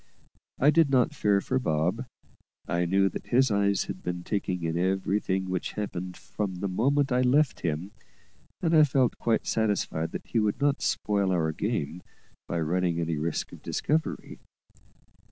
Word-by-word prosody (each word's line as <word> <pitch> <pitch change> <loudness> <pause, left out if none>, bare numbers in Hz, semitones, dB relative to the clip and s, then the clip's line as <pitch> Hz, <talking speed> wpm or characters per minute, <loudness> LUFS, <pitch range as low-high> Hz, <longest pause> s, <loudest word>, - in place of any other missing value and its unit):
I 145 +3 +5
did 160 -1 +4
not 130 -3 +3
fear 100 -1 +2
for 130 +5 0
Bob; 90 +5 0 0.6
I 85 0 0
knew 95 +3 +3
that - - -8
his 130 0 +3
eyes 100 -1 +2
had - - -7
been 90 0 -4
taking 95 -4 -2
in 80 0 -1
everything 95 +1 0
which 90 -1 -3
happened 90 -3 -5
from 100 -3 -4
the 95 +3 -3
moment 135 +9 +1
I 125 0 +3
left 135 +2 +3
him, 85 +4 -3 0.7
and 165 -1 +3
I 155 - +8
felt 135 -4 +2
quite 115 -1 +1
satisfied 100 -7 0
that - - -5
he 115 - 0
would 105 +2 0
not 145 0 +1
spoil 100 -2 0
our 80 -3 +1
game 80 +2 -3 0.5
by 85 - -2
running 85 +1 0
any 85 -1 -1
risk 80 +2 -2
of - - -12
discovery. 155 +2 -2
100 Hz, 165 wpm, -27 LUFS, 90-125 Hz, 0.7 s, I